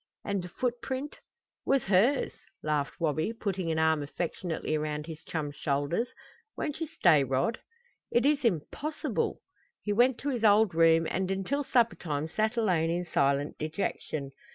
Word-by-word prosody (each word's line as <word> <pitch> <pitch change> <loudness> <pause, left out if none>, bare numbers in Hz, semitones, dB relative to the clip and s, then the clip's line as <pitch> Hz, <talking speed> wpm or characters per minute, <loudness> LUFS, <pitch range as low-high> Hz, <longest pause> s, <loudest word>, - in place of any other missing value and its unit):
"And 200 -2 -1
the 180 - -8
footprint 255 +5 -3 0.2
" - - -64 0.2
"Was 275 -2 +3
hers," 210 +9 +3 0.3
laughed 150 -2 -1
Wabi, 160 +5 0
putting 195 -6 -2
an 160 - 0
arm 160 -1 +3
affectionately 160 +2 -3
around 150 -1 -2
his 160 -1 -9
chum's 145 -3 -4
shoulders. 145 - 0 0.5
"Won't 300 -1 -3
you 325 - -1
stay, 165 - +4
Rod?" 135 - 0 0.5
"It 240 - +2
is 295 0 +3
impossible." 235 - -1 0.4
He 205 - 0
went 240 +3 +4
to 285 - -1
his 245 -5 -2
old 210 -2 +5
room, 165 0 +5
and 190 0 -1
until 195 +10 -1
suppertime 180 - +1
sat 220 +6 0
alone 180 -8 +2
in 175 +1 -1
silent 140 -2 +1
dejection. 155 -3 -3
180 Hz, 155 wpm, -29 LUFS, 155-230 Hz, 0.5 s, old